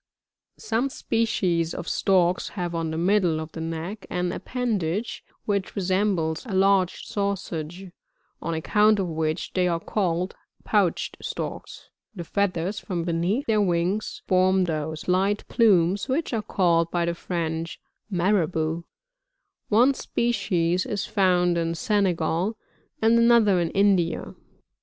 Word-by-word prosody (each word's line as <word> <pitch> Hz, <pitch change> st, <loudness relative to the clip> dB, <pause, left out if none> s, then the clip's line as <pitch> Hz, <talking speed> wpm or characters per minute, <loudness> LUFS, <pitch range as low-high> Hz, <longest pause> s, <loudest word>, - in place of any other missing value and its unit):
43. -, -, -13 dB
Some 235 Hz, +5 st, +1 dB
species 185 Hz, -10 st, 0 dB
of 175 Hz, -, -6 dB
Storks 180 Hz, -2 st, +2 dB
have 175 Hz, -2 st, -2 dB
on 165 Hz, -1 st, -2 dB
the 160 Hz, -, -3 dB
middle 175 Hz, -2 st, +2 dB
of 160 Hz, 0 st, -6 dB
the 160 Hz, -, -7 dB
neck 165 Hz, +6 st, -5 dB
an 180 Hz, 0 st, -1 dB
appendage 215 Hz, -4 st, -2 dB, 0.2 s
which 200 Hz, -2 st, -1 dB
resembles 185 Hz, -4 st, 0 dB
a 200 Hz, -, -3 dB
large 190 Hz, -1 st, +2 dB
sausage, 190 Hz, -3 st, -4 dB, 0.5 s
on 165 Hz, -, -2 dB
account 210 Hz, +6 st, +3 dB
of 195 Hz, -, 0 dB
which 160 Hz, 0 st, -2 dB
they 180 Hz, -1 st, +2 dB
are 170 Hz, -1 st, 0 dB
called, 180 Hz, -1 st, -1 dB, 0.3 s
Pouched -, -, 0 dB
Storks; -, -, -6 dB, 0.2 s
the 175 Hz, -, -5 dB
feathers 190 Hz, +1 st, -1 dB
from 175 Hz, -3 st, -3 dB
beneath 175 Hz, +10 st, 0 dB
their 215 Hz, -2 st, +2 dB
wings 180 Hz, +2 st, -1 dB
form 185 Hz, 0 st, +3 dB
those 155 Hz, -2 st, -3 dB
light 195 Hz, +3 st, +1 dB
plumes 200 Hz, -2 st, +3 dB
which 285 Hz, +1 st, -1 dB
are 225 Hz, -, 0 dB
called, 170 Hz, -5 st, +2 dB
by 175 Hz, -1 st, 0 dB
the 170 Hz, -, 0 dB
French, 165 Hz, -1 st, -3 dB, 0.3 s
Marabovs; 170 Hz, -3 st, 0 dB, 0.9 s
one 245 Hz, +6 st, +5 dB
species 185 Hz, -9 st, 0 dB
is 205 Hz, -2 st, -2 dB
found 180 Hz, -3 st, +2 dB
in 165 Hz, 0 st, -1 dB
Senegal, 185 Hz, +1 st, 0 dB, 0.5 s
and 230 Hz, +1 st, +5 dB
another 230 Hz, -5 st, +5 dB
in 170 Hz, -1 st, 0 dB
India. 190 Hz, -4 st, +1 dB
185 Hz, 135 wpm, -25 LUFS, 170-205 Hz, 0.9 s, one